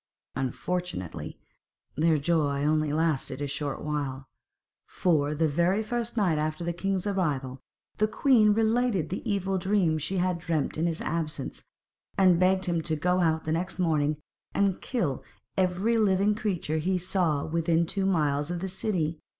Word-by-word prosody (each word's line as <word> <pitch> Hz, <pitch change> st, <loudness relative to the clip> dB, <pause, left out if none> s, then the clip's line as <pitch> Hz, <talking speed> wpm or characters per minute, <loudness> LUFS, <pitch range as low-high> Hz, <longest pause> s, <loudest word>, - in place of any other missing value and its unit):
Unfortunately, 135 Hz, -, -3 dB, 0.6 s
their 160 Hz, +1 st, +3 dB
joy 145 Hz, -2 st, +1 dB
only 155 Hz, 0 st, +2 dB
lasted 150 Hz, -4 st, 0 dB
a 145 Hz, -, -2 dB
short 140 Hz, 0 st, -3 dB
while; 140 Hz, -3 st, -3 dB, 0.6 s
for 150 Hz, -4 st, +1 dB
the 160 Hz, +1 st, +2 dB
very 175 Hz, +8 st, +1 dB
first 240 Hz, +1 st, -3 dB
night 175 Hz, -8 st, +2 dB
after 155 Hz, +2 st, -2 dB
the 170 Hz, 0 st, -1 dB
king's 190 Hz, +2 st, -2 dB
arrival 145 Hz, -10 st, -1 dB, 0.4 s
the 215 Hz, -, +4 dB
queen 220 Hz, -3 st, +4 dB
related 220 Hz, -5 st, +1 dB
the 185 Hz, -, -3 dB
evil 195 Hz, -1 st, 0 dB
dream 180 Hz, -4 st, +1 dB
she 185 Hz, +6 st, -2 dB
had 180 Hz, -1 st, 0 dB
dreamt 160 Hz, -4 st, -1 dB
in 160 Hz, +2 st, 0 dB
his 165 Hz, -1 st, -2 dB
absence, 155 Hz, -4 st, -3 dB, 0.5 s
and 185 Hz, -3 st, +5 dB
begged 185 Hz, +1 st, +3 dB
him 170 Hz, -2 st, 0 dB
to 160 Hz, 0 st, 0 dB
go 180 Hz, +4 st, +1 dB
out 160 Hz, -2 st, +1 dB
the 155 Hz, -, -1 dB
next 175 Hz, +3 st, -2 dB
morning 155 Hz, -4 st, +1 dB, 0.4 s
and 195 Hz, -2 st, +1 dB
kill 175 Hz, -, -2 dB, 0.3 s
every 190 Hz, +5 st, +1 dB
living 200 Hz, 0 st, +3 dB
creature 185 Hz, -7 st, -2 dB
he 185 Hz, +4 st, 0 dB
saw 175 Hz, -5 st, +1 dB
within 165 Hz, +1 st, +1 dB
two 195 Hz, +3 st, -1 dB
miles 150 Hz, -5 st, +1 dB
of 175 Hz, 0 st, -2 dB
the 190 Hz, -, -3 dB
city. 175 Hz, -5 st, -1 dB
170 Hz, 160 wpm, -27 LUFS, 150-190 Hz, 0.6 s, and